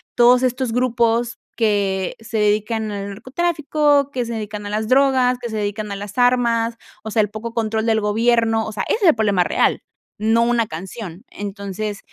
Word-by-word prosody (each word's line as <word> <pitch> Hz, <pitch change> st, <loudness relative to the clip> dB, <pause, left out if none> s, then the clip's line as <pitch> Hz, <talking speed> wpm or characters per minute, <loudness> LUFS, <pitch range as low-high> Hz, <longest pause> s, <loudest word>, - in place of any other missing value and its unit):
todos 245 Hz, +1 st, +5 dB
estos 255 Hz, -1 st, 0 dB
grupos 235 Hz, -1 st, +1 dB, 0.2 s
que 200 Hz, -4 st, 0 dB
se 225 Hz, 0 st, -5 dB
dedican 215 Hz, +1 st, 0 dB
al 200 Hz, 0 st, -5 dB
narcotráfico, 290 Hz, -, +1 dB
que 250 Hz, -3 st, -2 dB
se 235 Hz, -, -5 dB
dedican 210 Hz, -1 st, -5 dB
a -, -, -4 dB
las 215 Hz, +1 st, -2 dB
drogas, 255 Hz, -1 st, +3 dB
que 240 Hz, -1 st, -5 dB
se 220 Hz, -, -4 dB
dedican 210 Hz, 0 st, -3 dB
a -, -, -3 dB
las 205 Hz, +2 st, -8 dB
armas, 235 Hz, -2 st, +2 dB, 0.3 s
o 220 Hz, -, -6 dB
sea, 220 Hz, -, +3 dB
el 210 Hz, -, 0 dB
poco 220 Hz, +2 st, -6 dB
control 220 Hz, -1 st, -1 dB
del 225 Hz, -1 st, +2 dB
gobierno, 225 Hz, +1 st, +2 dB
o 220 Hz, -, -5 dB
sea, 210 Hz, -2 st, -3 dB
ese -, -, +1 dB
es 360 Hz, -, +7 dB
el -, -, +4 dB
problema 205 Hz, -5 st, +2 dB
real, -, -, +1 dB, 0.4 s
no 225 Hz, +2 st, +2 dB
una 235 Hz, -1 st, +2 dB
canción. 185 Hz, +2 st, -8 dB
Entonces, 200 Hz, 0 st, -5 dB
225 Hz, 190 wpm, -20 LUFS, 210-240 Hz, 0.4 s, es